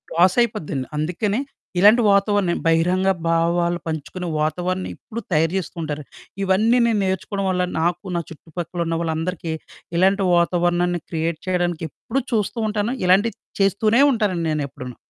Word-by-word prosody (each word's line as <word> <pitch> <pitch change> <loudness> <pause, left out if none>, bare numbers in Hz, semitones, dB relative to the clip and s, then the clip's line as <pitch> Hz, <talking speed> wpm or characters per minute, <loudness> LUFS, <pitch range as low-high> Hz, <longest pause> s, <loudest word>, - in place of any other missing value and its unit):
లాసయిపోద్దండి. 175 - +2
అందుకనే 190 +9 -1 0.4
ఇలాంటి 215 +5 +7
వాతావరణం 200 -2 +2
బహిరంగ 180 +4 +3 0.2
భావాలు 170 +1 +1
పంచుకునే 160 +3 -4
వాతావరణం 180 +4 -1
ఎప్పుడు 230 +1 -8
తయారు 165 +2 +2
చేస్తూ 185 - -5
ఉంటారు. 150 -1 -4 0.4
ఇవన్నీ 215 +6 +3
నేను 220 -3 +1
నేర్చుకోడం 190 +1 -2
వల్ల, 180 -1 +1 0.2
నాకు 175 +3 0
నా 170 - 0
చుట్టుపక్కలున్న 165 +1 -4
వాళ్ళందరికీ 165 0 -2 0.4
ఇలాంటి 195 +2 +3
వాతావరణాన్ని 175 0 +1
క్రియేట్ 165 -1 -1
చెయడానికెప్పుడూ 175 - -2
చూస్తూ 220 +1 0
ఉంటాను. 210 +3 -1
ఇలాంటియి 195 +4 +3 0.3
చేస్తూనే 215 +5 +3
ఉంటానండి 195 -9 0
నేనెప్పుడూను. 140 -4 -4
180 Hz, 120 wpm, -22 LUFS, 165-200 Hz, 0.4 s, ఇలాంటి